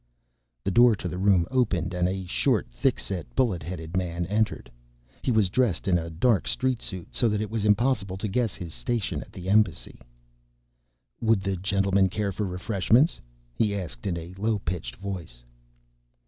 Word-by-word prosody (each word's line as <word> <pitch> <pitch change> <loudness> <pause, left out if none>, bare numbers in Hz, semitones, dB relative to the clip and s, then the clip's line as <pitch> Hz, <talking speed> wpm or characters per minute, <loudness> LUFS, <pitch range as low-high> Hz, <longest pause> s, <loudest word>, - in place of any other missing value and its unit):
The 100 - 0
door 120 +2 +6
to 95 - -5
the 90 +1 -4
room 95 -3 +4
opened, 100 -9 +1
and 90 0 +1
a 95 0 -3
short, - - +1
thick - - +1
set, 95 -3 -5
bullet 115 -10 +2
headed 80 +1 -6
man 85 -2 -1
entered. 105 - -1 0.5
He - - -1
was 110 -6 +3
dressed 115 -9 +1
in 90 -2 +3
a 85 0 -5
dark 90 - +2
street 130 -2 0
suit, 95 -4 -6
so 120 - +2
that 105 -1 0
it 105 0 -3
was 110 -2 -1
impossible 105 -3 +2
to 105 - -3
guess 115 +1 0
his 85 -3 -7
station 105 - -2
at - - -12
the 90 0 -8
Embassy. 95 -4 +1 1.2
"Would 110 -3 +3
the 95 0 -1
gentlemen 100 +1 +2
care 100 +1 -1
for 100 +2 -2
refreshments?" 100 - +2 0.3
he 105 -2 +1
asked 85 -10 -5
in 85 -3 -1
a 85 +2 -7
low 110 +1 +1
pitched 80 -10 -4
voice. 85 -10 -7
95 Hz, 175 wpm, -26 LUFS, 90-110 Hz, 1.2 s, door